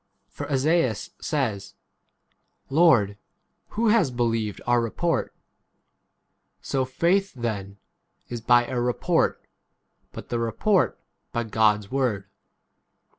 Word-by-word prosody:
For - - -7
Esaias 140 -4 +1
says, 110 -11 -2 1.0
Lord, 140 - +5
l? - - -15 0.5
who 225 +1 0
has 210 -9 +4
believed 115 -4 -1
our 120 0 +3
report? 165 +9 -1 1.3
So 135 -1 -1
faith 175 +9 +1
then 105 -5 -4 0.5
[is] 120 -1 -6
by 120 +1 +4
a 125 0 -2
report, 125 0 0 0.7
but - - -10
the 120 - -1
18 115 - -1
report 185 - +1 0.3
by 120 - -1
God's 105 -2 +1
word. 125 -8 0
120 Hz, 110 wpm, -25 LUFS, 110-150 Hz, 1.3 s, Lord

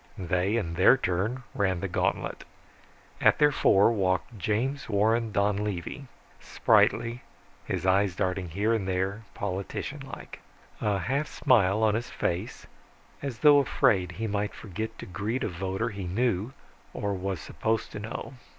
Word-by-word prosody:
They 90 +2 0
in 85 -7 -2
their 95 +9 +6
turn 110 +4 -1
ran 95 -3 0
the 95 - -2
gantlet. - - -1 0.8
At - - +5
their 150 -1 +5
fore 100 -5 +4
walked 95 +1 0
James 120 +8 -1
Warren 110 +2 +2
Donlevy, 100 - -1 0.3
spritely, 115 +1 +2 0.5
his - - -2
eyes 95 0 +3
darting 90 0 -1
here, 105 +7 +1
there, 95 +3 -2
politician 100 +8 -4
like. 135 - -9 0.4
A 105 -2 +1
half 135 - -1
smile 110 -3 +3
on 110 -1 +4
his 120 +3 -2
face, 90 +6 -3 0.6
as 135 -4 -4
though 145 -1 +9
afraid 95 -9 +2
he 110 +5 -4
might 105 0 -2
forget 110 +2 -6
to - - -8
greet 105 +8 -3
a - - 0
voter 95 +5 -2
he 100 -3 -6
knew, 105 +3 0 0.4
or 100 0 -1
was 95 -1 -3
supposed 110 0 -2
to - - -6
know. 110 +5 -6
100 Hz, 145 wpm, -28 LUFS, 95-115 Hz, 0.8 s, though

